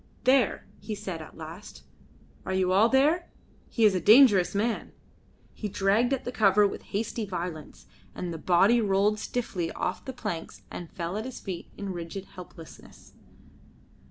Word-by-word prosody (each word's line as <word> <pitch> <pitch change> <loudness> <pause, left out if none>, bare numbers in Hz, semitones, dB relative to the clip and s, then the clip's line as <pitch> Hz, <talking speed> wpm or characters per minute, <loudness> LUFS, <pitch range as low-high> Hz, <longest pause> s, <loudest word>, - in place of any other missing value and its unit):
"There!" 255 -4 +3
he 215 - -5
said 180 -5 -6
at 155 - -12
last. 165 +5 -10 0.6
"Are 190 - -3
you 185 -1 +1
all 205 +5 +5
there? 300 +7 +2 0.4
He 230 - +2
is 210 - +5
a 185 - +1
dangerous 210 -4 +6
man." 225 +3 -1 0.6
He 210 - -5
dragged 205 +6 +2
at 270 - -1
the 245 - -3
cover 210 -3 +4
with - - -6
hasty 220 +2 -3
violence, 175 -5 -6 0.3
and 175 -2 -4
the 165 - -6
body 195 +8 +4
rolled 205 +1 +2
stiffly 190 -10 -3
off - - -3
the 265 - -5
planks 210 -9 -6
and 175 -2 -7
fell 175 0 -4
at 220 - -4
his 260 - -7
feet 185 -4 -6
in 200 -2 -4
rigid 175 +3 -6
helplessness. 175 -3 -13
200 Hz, 160 wpm, -27 LUFS, 180-225 Hz, 0.6 s, dangerous